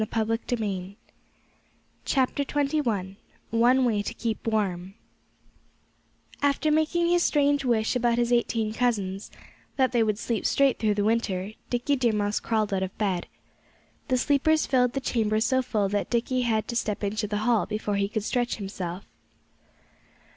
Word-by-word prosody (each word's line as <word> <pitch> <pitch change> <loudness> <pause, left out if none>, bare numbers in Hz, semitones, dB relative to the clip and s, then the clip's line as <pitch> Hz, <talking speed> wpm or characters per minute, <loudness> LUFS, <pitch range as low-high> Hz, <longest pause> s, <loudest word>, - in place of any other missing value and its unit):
XXI 215 -3 -2 2.6
ONE 245 +3 +4
WAY 215 -4 +1
TO 205 - -4
KEEP 230 -1 -3
WARM 195 -4 -1 1.5
After 285 +2 +2
making 315 +3 +2
his 350 0 +3
strange 285 -3 +2
wish 235 -2 +1
about 240 -1 +2
his 240 0 +1
eighteen 225 -2 +1
cousins 205 -5 -1 0.5
that 260 -2 +2
they 240 -2 +2
would 215 -2 +1
sleep 230 0 -1
straight 275 -2 +2
through 215 -2 +1
the 205 - 0
winter 205 -3 0 0.2
Dickie 250 +4 0
Deer 240 -3 +2
Mouse 205 0 0
crawled 215 -3 -1
out 190 - 0
of 190 0 -4
bed. 190 -5 -1 0.8
The 255 - +2
sleepers 290 +4 +2
filled 250 -2 +2
the 270 - -2
chamber 220 -4 0
so 260 +3 +2
full 215 -5 0
that 205 0 -1
Dickie 250 +2 0
had 220 -3 0
to 235 - -3
step 215 -3 -2
into 210 +1 -1
the 210 0 -2
hall 235 -3 +2
before 210 -1 -2
he 200 0 0
could 215 -1 -2
stretch 245 +2 0
himself. 190 -3 -6
225 Hz, 145 wpm, -26 LUFS, 205-250 Hz, 2.6 s, ONE